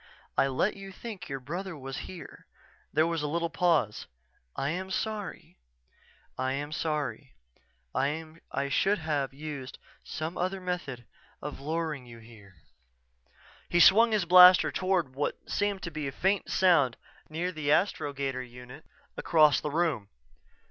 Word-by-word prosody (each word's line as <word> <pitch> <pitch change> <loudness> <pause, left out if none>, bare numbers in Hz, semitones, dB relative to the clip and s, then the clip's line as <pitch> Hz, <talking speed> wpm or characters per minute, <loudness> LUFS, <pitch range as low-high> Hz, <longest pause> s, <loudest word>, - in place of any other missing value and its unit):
I 135 - +3
let 135 +10 0
you 195 0 -9
think 210 -2 -8
your 135 0 -3
brother 170 +6 -5
was 135 -1 -6
here...._" 185 -3 -10 0.5
There 155 - +3
was 165 -1 -1
a 150 - -1
little 170 +2 -1
pause. 165 - +1 0.5
"I 140 - -1
am 185 +2 -4
sorry. 210 - -4 0.8
I 130 0 0
am 145 +2 -4
sorry. 150 -3 -3 0.6
I 155 0 -3
should 195 +9 +2
have 150 -5 -1
used 140 -2 -7 0.3
some 155 +4 -5
other 185 +2 -1
method 175 -10 -4 0.3
of 150 -1 -6
luring 155 -3 -3
you 115 -1 -11
here." 110 -4 -16 1.1
He 175 - +2
swung 225 +6 +7
the 210 -5 +1
blaster 180 +1 +8
toward 185 -7 0
what 145 +2 -2
seemed 205 -1 -1
to 170 - -4
be 150 -2 -4
a - - -3
faint 190 +8 0
sound 165 -10 +3 0.3
near 170 +4 -2
the 155 -4 -3
astrogator 140 -7 0
unit 125 +4 -11 0.3
across 155 -3 +4
the 150 - -2
room. 145 - 0
155 Hz, 140 wpm, -29 LUFS, 135-180 Hz, 1.1 s, blaster